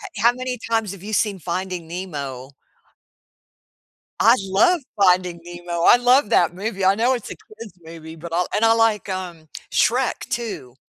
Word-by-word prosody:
He 205 - -5
how 235 +1 +6
many 255 0 -4
times 225 -3 -2
have 195 -1 -12
you 215 - -7
seen 205 -2 +1
Finding 180 0 -4
Nemo? 145 -7 -6 1.7
I 230 +2 +6
love 205 - +2 0.2
Finding 180 -2 +3
Nemo, 175 -1 -5
I - - +8
love 245 -1 +3
that 175 -6 +3
movie, 195 0 -3
I 195 +1 +4
know 240 +4 +2
it's 240 -4 -5
a - - -6
kid's 230 - -13
movie, 160 0 -11
but 165 +1 -9
I'll 180 +1 0
and 215 - 0
I 225 - +5
like, 225 -3 +1
um, 175 -4 -6 0.2
Shrek 245 +3 +1
too. 195 - -5
190 Hz, 170 wpm, -21 LUFS, 170-230 Hz, 1.7 s, I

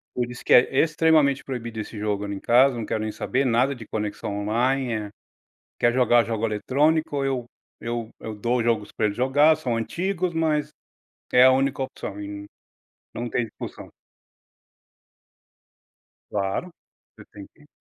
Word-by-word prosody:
Por 125 -1 -1
isso 120 - -10
que - - +3
é, 130 +2 +5
extremamente 155 -3 +3
proibido 115 -4 -5
esse 110 +1 -6
jogo 105 -1 -2
ali 100 0 -4
em - - -6
casa, 130 +2 +4
não 115 -2 -4
quero 110 - -2
nem 110 0 -2
saber, 135 +5 -1
nada 125 +3 +2
de 115 -3 -10
conexão 105 -1 -4
online, 125 +4 0
eh. 105 -2 -3 0.7
Quer 120 0 +3
jogar 120 -2 +4
jogo 115 0 -1
eletrônico? 145 +7 +1
Eu 130 -3 -1 0.3
eu 115 -1 -4
eu 110 - -6
dou 120 +3 0
jogos 115 -3 0
pra - - -1
ele 100 - 0
jogar, 145 +6 +4
são 130 -6 -2
antigos, 180 - -2
mas 155 -2 0 0.6
é 125 0 +7
a 130 - +7
única 135 +1 +1
opção 105 -5 -6
e 100 0 -7 0.7
não 120 0 -4
tem 120 +1 0
discussão. - - -9 2.4
Claro, 100 - -2 0.5
você - - -13
tem 100 -1 -10
que 150 -2 -21
120 Hz, 160 wpm, -24 LUFS, 110-140 Hz, 2.4 s, é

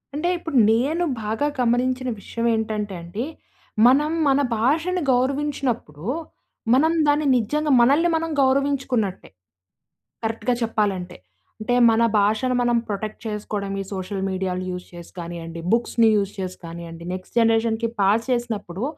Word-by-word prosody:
అంటే, 325 +4 0
ఇప్పుడు 325 -5 -3
నేను 280 +10 +1 0.2
బాగా 220 +7 -1
గమనించిన 250 +1 +1
విషయవేంటంటే 220 -2 -2
అండీ, 175 +9 -5 0.6
మనం 290 +5 +4 0.2
మన 275 0 +4 0.2
భాషని 320 +10 +1
గౌరవించినప్పుడూ, 255 - -1 0.7
మనం 305 +5 +4 0.2
దాన్ని 295 +1 +2
నిజ్జంగా, 295 +6 0
మనల్ని 290 +8 +4
మనం 330 0 -1
గౌరవించుకున్నట్టే, 265 -7 0 1.0
కరక్ట్‌గా 225 +2 0
చెప్పాలంటే. 200 -5 -1 0.4
అంటే, 230 +3 0 0.2
మన 225 +1 +3 0.2
భాషను 215 +5 +2
మనం 240 0 +2
ప్రొటెక్ట్ 210 +1 -4
చేసుకోడం, 210 -2 -4
ఈ - - -8
సోషల్ 190 0 -4
మీడియాలు 185 -1 -2
యూజ్ 180 0 -6
చేసి 175 -1 -11
కానియ్యండి, 170 -1 -6
బుక్స్‌ని 230 -1 +3
యూజ్ 200 -1 0
చేసి 185 -1 -4
కానియ్యండి. 165 0 -9
నెక్స్ట్ 185 0 -9
జనరేషన్‌కి 225 0 +2
పాస్ 210 +4 +3
చేసినప్పుడు, 220 -5 -3
225 Hz, 125 wpm, -23 LUFS, 195-260 Hz, 1.0 s, మనం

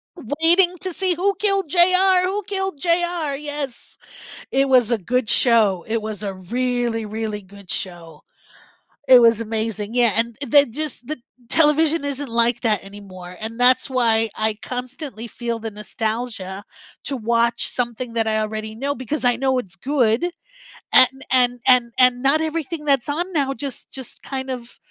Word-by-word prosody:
Waiting 335 - +2
to 370 -2 -4
see, 370 +1 +1
who 385 +4 0
killed 395 -5 +5
JR 365 +2 +5
who 395 +3 -1
killed 385 -6 0
JR, 340 -4 +1
yes, 290 -4 -6 0.6
it 270 +1 +2
was 250 -3 +4
a 235 - +1
good 240 +4 -1
show, 215 -7 +3
it 225 +1 0
was 215 -2 -5
a 195 -2 -4
really, 235 +3 -2
really 215 -1 -4
good 200 0 -16
show, 170 -5 -6 0.8
it 255 -2 +8
was 230 -1 +5
amazing, 220 -1 -3
yeah, 240 -4 +4
and 230 0 -1
th 285 0 +6
just 290 -2 -5
the 310 - -4 0.3
television 310 0 +3
isn't 285 0 -4
like 235 +1 +1
that 215 -4 +1
anymore, 190 -3 -11
and 225 +1 -6
that's 250 +1 +4
why 225 -4 +2
I 215 -1 -1
constantly 250 -1 -6
feel 235 0 -4
the 225 0 -5
nostalgia 210 -2 -5 0.4
to 275 - -3
watch 235 +1 0
something 240 -1 -4
that 225 -1 0
I 220 0 0
already 215 0 -4
know 275 +5 -3
because 260 +4 -4
I 245 -1 +3
know 260 +1 0
it's 195 -6 -6
good 255 - +1 0.7
and 265 +1 +4
and 245 -1 +2
and 245 -2 +4
and 250 -1 +4
not 280 +4 +3
everything 320 -1 -4
that's 275 -2 +1
on 350 +6 -3
now 275 -4 0
just 270 +1 -6
just 260 -3 -8
kind 265 -1 -5
of 245 -1 -8
245 Hz, 165 wpm, -21 LUFS, 220-290 Hz, 0.8 s, it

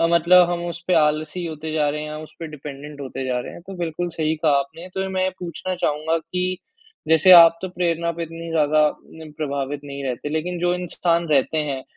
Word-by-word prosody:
अ, 165 - +4
मतलब 175 +1 +6
हम 175 0 -2
उसपे 175 +1 -2
आलसी 155 +2 +1
होते 155 0 -6
जा 150 -2 +1
रहे 150 +1 -3
हैं, 150 - -6
हम 155 - -6
उसपे 160 +1 -9
डिपेंडेंट 145 0 -9
होते 135 -1 -5
जा 125 -1 0
रहे - - -8
हैं 170 - -11
तो 195 - -7
बिल्कुल 175 0 -3
सही 160 0 +1
कहा 155 -1 +2
आपने। 160 +6 -6
तो 190 0 -2
मैं 190 0 -1
ये 185 - +1
पूछना 180 +1 -4
चाहूँगा 160 -1 0
कि 180 +2 -3 0.5
जैसे 160 +3 +5
आप 165 -1 +9
तो 190 - -3
प्रेरणा 170 -2 -1
पे 170 - -5
इतनी 165 0 -7
ज़्यादा 155 -1 +3 0.4
न 155 - -11
प्रभावित 140 -1 -3
नहीं 140 -1 -6
रहते 130 +2 -3
लेकिन 170 +3 -2
जो 175 0 +2
इंसान 170 -1 -1
रहते 150 +2 +2
हैं, 140 -3 -2
160 Hz, 215 wpm, -22 LUFS, 150-175 Hz, 0.5 s, आप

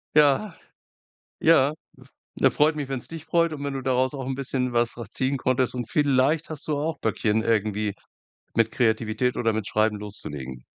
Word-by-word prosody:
Ja, 150 +6 +4 0.8
ja. 150 -3 +4 0.7
Ja, - - +5
freut 155 +2 +2
mich, 145 -2 -3
wenn's 135 -2 -4
dich 165 -1 -8
freut 170 -1 +2
und 145 -2 -6
wenn 140 -1 -3
du 135 - -3
daraus 130 +1 +1
auch 135 -2 -5
'n 135 0 -2
bisschen 130 -1 -1
was 120 0 +2
draus 115 -4 -8
ziehen 135 +1 0
konntest. 130 0 0
Und 120 -3 -4
vielleicht 145 +2 +2
hast 155 -3 -7
du 150 -2 0
auch 155 +1 -2
Böckchen 110 0 0
irgendwie 105 -2 0 0.6
mit 115 -1 +2
Kreativität 115 +1 0
oder 115 -2 +1
mit 110 -2 -2
Schreiben 110 -1 +1
loszulegen. 70 -11 -7
130 Hz, 180 wpm, -25 LUFS, 110-145 Hz, 0.8 s, Ja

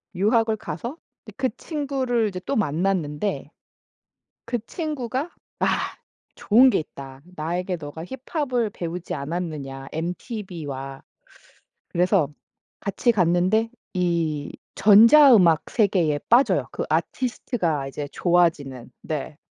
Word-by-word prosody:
유학을 220 +3 +2
가서 220 - -6 0.3
네 - - -10
그 265 -1 +1
친구를 270 -7 -1
이제 185 -2 -6
또 275 - -1
만났는데 175 - -1 0.9
그 240 +1 -1
친구가 290 -2 -3 0.3
"아 - - +2 0.7
좋은 245 +5 +5
게 - - +2
있다. 135 -3 -9
나에게 175 +4 -2
너가 160 0 -8
힙합을 255 - -2
배우지 175 0 -5
않았느냐 140 -3 -5
엠티비와." 160 - -5 0.8
그래서 180 -2 +2 0.5
같이 210 +4 +1
갔는데 185 +3 +2 0.3
이 165 -5 -1 0.2
전자 230 +7 +8
음악 170 -7 +4
세계에 180 -9 +2
빠져요. 210 - +4
그 - - -4
아티스트가 165 - -1
이제 145 +1 -5
좋아지는 160 -8 +1
네. 155 -1 -4
180 Hz, 240 characters per minute, -24 LUFS, 155-230 Hz, 0.9 s, 전자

